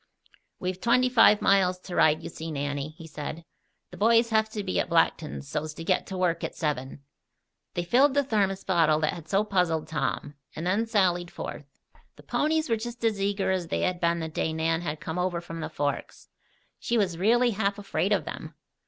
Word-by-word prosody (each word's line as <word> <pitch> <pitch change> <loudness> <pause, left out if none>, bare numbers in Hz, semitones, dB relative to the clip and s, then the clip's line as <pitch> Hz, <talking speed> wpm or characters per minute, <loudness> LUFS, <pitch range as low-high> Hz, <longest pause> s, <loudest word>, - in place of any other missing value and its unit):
"We've 185 0 -3
twenty 250 +2 +3
five 225 -4 +5
miles 185 -2 +4
to 180 -2 -7
ride, 155 0 +4
you - - -5
see, 160 0 -7
Nannie," 145 +1 -3
he 165 - -10
said. 155 +1 -7 0.5
"The - - -10
boys 230 +2 +4
have 220 0 +2
to 215 -1 -4
be 185 - -1
at - - -1
Blackton's 165 -3 +1
so's 155 +1 -4
to 165 - -7
get 185 +2 +1
to 190 - -5
work 170 -2 0
at - - -4
seven." 140 -3 -3 0.7
They 175 - -1
filled 265 +9 +4
the 285 - +4
thermos 200 -6 0
bottle 160 -4 +3
that 155 - +1
had 165 -3 -10
so 195 +2 +3
puzzled 180 -6 0
Tom, 150 -1 -2 0.2
and 160 - -5
then 205 +6 +1
sallied 180 -5 +1
forth. 150 -4 -7 0.5
The - - -16
ponies 315 +1 0
were 230 -2 +1
just 240 +2 -7
as 215 -3 +1
eager 195 -1 0
as 185 -3 -1
they - - -1
had 180 -1 0
been 170 -1 +1
the 160 - -3
day 160 0 -2
Nan 165 +1 0
had 155 -3 -4
come 160 +2 -4
over 180 -1 0
from 165 -1 -8
the - - -4
Forks. 145 0 -4 0.5
She 235 - 0
was 180 -6 0
really 240 +5 +4
half 200 -1 -1
afraid 200 -1 -1
of - - +2
them. - - -7
180 Hz, 205 wpm, -27 LUFS, 160-210 Hz, 0.7 s, five